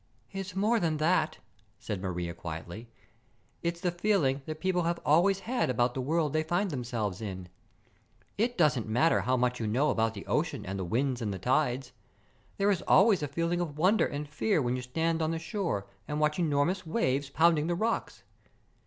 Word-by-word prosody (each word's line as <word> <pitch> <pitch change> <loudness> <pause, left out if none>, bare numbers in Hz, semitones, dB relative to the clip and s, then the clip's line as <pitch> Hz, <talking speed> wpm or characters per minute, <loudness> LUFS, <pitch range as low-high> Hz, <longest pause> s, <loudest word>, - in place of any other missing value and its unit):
"It's 195 -1 -6
more 215 +4 +2
than 160 -4 0
that," 160 0 +1 0.4
said 100 -2 -5
Maria 90 -2 -3
quietly. 85 +7 -7 0.7
"It's 170 0 -2
the 175 0 0
feeling 175 -7 +1
that 155 0 -5
people 185 0 +1
have 170 0 -1
always 185 +6 +4
had 245 - -1
about 120 0 +1
the 130 - -3
world 155 +2 0
they 155 - +2
find 175 +4 0
themselves 115 -7 -3
in. 95 -4 -6 0.9
It 240 +4 0
doesn't 135 - +2
matter 125 +10 +3
how 130 +1 +1
much 125 0 0
you 110 - -2
know 130 +8 +2
about 110 -1 0
the 100 - -8
ocean - - -1
and 95 +1 -4
the - - -2
winds 125 +7 -1
and 105 -3 -2
the 95 - -3
tides, 130 +2 0 0.7
there 200 +1 +3
is 190 - 0
always 195 -2 +5
a 145 - -1
feeling 170 +4 -1
of 155 -4 -4
wonder 185 +7 +3
and 145 +1 -5
fear 195 +6 0
when 125 -3 0
you 125 - -3
stand 160 +6 -1
on 160 - +1
the 165 - -1
shore 165 - -2 0.2
and 150 0 -2
watch 150 +2 +1
enormous 165 +3 +1
waves 145 - 0
pounding 160 +1 +3
the 175 - 0
rocks. 225 +5 -2
150 Hz, 190 wpm, -29 LUFS, 125-175 Hz, 0.9 s, always